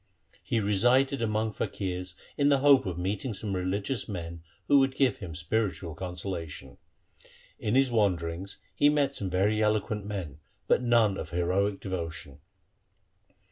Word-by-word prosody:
He 115 - -1
resided 120 +6 +3
among 110 -1 0
faqirs 90 -3 -4 0.2
in 145 0 +3
the 140 - +5
hope 135 -6 +6
of 90 -2 -3
meeting 100 +6 -2
some 100 -1 -2
religious 100 +8 -2
men 85 -4 -6 0.3
who 140 - +6
would 135 -1 +2
give 130 -6 +2
him 85 -6 -7
spiritual 85 0 -2
consolation. 90 -1 -5 0.8
In 105 +3 -1
his 135 -1 +4
wanderings 95 -4 0 0.2
he 145 - +4
met 145 -2 +2
some 100 -8 -3
very 100 +4 +1
eloquent 105 -1 0
men, 95 -9 -5 0.3
but - - +3
none 115 -5 +3
of 75 - -6
heroic 95 +4 0
devotion. 85 -6 -5
100 Hz, 140 wpm, -28 LUFS, 90-115 Hz, 0.8 s, hope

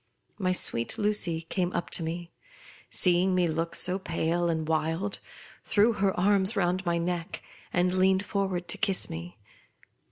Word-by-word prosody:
My 185 -2 +1
sweet 120 - +2
Lucy 205 -6 +2
came 175 +2 -2
up 175 - -3
to - - +3
me, 170 +1 -5 0.6
seeing 185 +1 +2
me 180 -1 +2
look 165 +1 -2
so 185 +1 +2
pale 170 -1 -1
and 160 -2 -2
wild, 160 +5 -1 0.4
threw 220 +3 +3
her 195 -3 0
arms 200 +2 +3
round 185 -1 0
my 170 0 +1
neck, 170 0 -4 0.3
and 180 0 +1
leaned 190 +1 +2
forward 190 -3 -2
to - - 0
kiss 195 -2 0
me. 85 +4 -8
180 Hz, 155 wpm, -27 LUFS, 165-190 Hz, 0.6 s, to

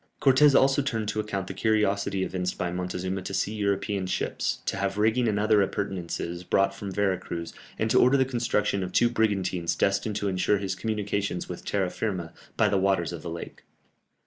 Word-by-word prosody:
Cortès 140 +1 +6
also 135 +1 +3
turned 115 -6 -2
to 110 - -2
account 100 -3 -2
the - - -6
curiosity 100 -3 +1
evinced 90 -1 -3
by 90 -2 -2
Montezuma 90 +1 -3
to 95 +1 -5
see 100 +2 0
European 100 -2 -1
ships, - - -2
to - - -1
have 100 0 -1
rigging 110 +3 +2
and 105 -2 +1
other 105 0 +4
appurtenances 90 -3 -3
brought 95 +2 +2
from 100 0 -6
Vera 95 -1 +1
Cruz, 85 -1 -6 0.2
and 110 - 0
to - - +5
order 130 +3 +5
the 130 - +3
construction 115 -5 0
of 90 -1 -4
two 120 0 +4
brigantines 95 -7 0
destined 100 +2 0
to 100 -1 -1
ensure 95 +2 +2
his 100 -1 -2
communications 100 -2 -2
with - - -7
terra 95 -3 0
firma 90 -7 -3 0.2
by 110 - +4
the 100 -1 +2
waters 95 -3 +1
of 85 - -6
the 85 - -6
lake. 85 0 -7
100 Hz, 195 wpm, -27 LUFS, 95-110 Hz, 0.2 s, Cortès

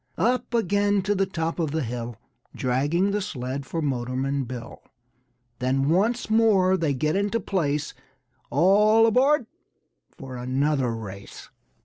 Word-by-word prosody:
Up 250 +2 0
again 205 -2 +1
to 205 +2 +1
the 195 -1 0
top 165 -2 -3
of 160 -3 0
the 155 +1 -1
hill 120 0 -5 0.4
Dragging 145 +10 +1
the 205 +1 -1
sled 135 -6 -5
for 165 -1 -3
Motorman 135 +1 -1
Bill. 120 -1 -8 0.8
Then 135 +2 +1
once 215 +9 +1
more 215 -4 +4
they 160 -6 0
get 155 +5 0
into 205 +3 0
place, 150 -9 -1 0.6
All 210 +8 +5
aboard! 260 +4 +3 0.6
for 130 -1 -9
another 130 +1 0
race. 100 -3 -9
160 Hz, 130 wpm, -25 LUFS, 130-205 Hz, 0.8 s, All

